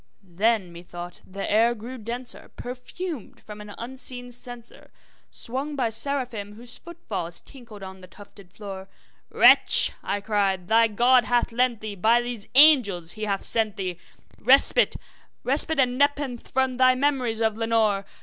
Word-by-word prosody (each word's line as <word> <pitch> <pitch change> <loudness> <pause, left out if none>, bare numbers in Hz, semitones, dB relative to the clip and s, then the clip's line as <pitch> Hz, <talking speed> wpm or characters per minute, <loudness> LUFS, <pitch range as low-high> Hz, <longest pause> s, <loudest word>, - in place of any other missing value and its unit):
Then, 205 -3 0
methought, 175 0 -10
the 195 +1 -6
air 230 +3 +2
grew 240 +4 -9
denser, 240 +3 -4
perfumed 255 - -8
from 210 -1 -12
an 210 -1 -11
unseen 245 0 -4
censer 245 -1 -5 0.4
Swung 270 +5 -3
by 245 -5 -1
Seraphim 235 -5 -4
whose 235 +3 -4
foot 340 -1 -13
falls 175 -5 -1
tinkled 230 -7 -13
on 190 0 -10
the 185 - -13
tufted 200 -1 -16
floor. 195 -2 -10 0.4
`Wretch,' - - +6
I 205 - -3
cried, 200 -3 -1
`thy 225 0 +2
God 245 +1 +4
hath 245 -1 0
lent 240 -1 0
thee 215 -1 -6
by 220 +5 +2
these 240 -3 -5
angels 235 - +4
he 215 0 -5
has 200 -2 -3
sent 220 -3 +1
thee 185 -4 -5 0.4
Respite 275 - +6 0.5
respite 290 +3 +4
and 250 -1 +1
nepenthe 285 -4 -1
from 265 -1 -1
thy 255 0 +4
memories 255 -4 -1
of 220 -1 0
Lenore! 220 -3 0
230 Hz, 150 wpm, -24 LUFS, 205-255 Hz, 0.5 s, `Wretch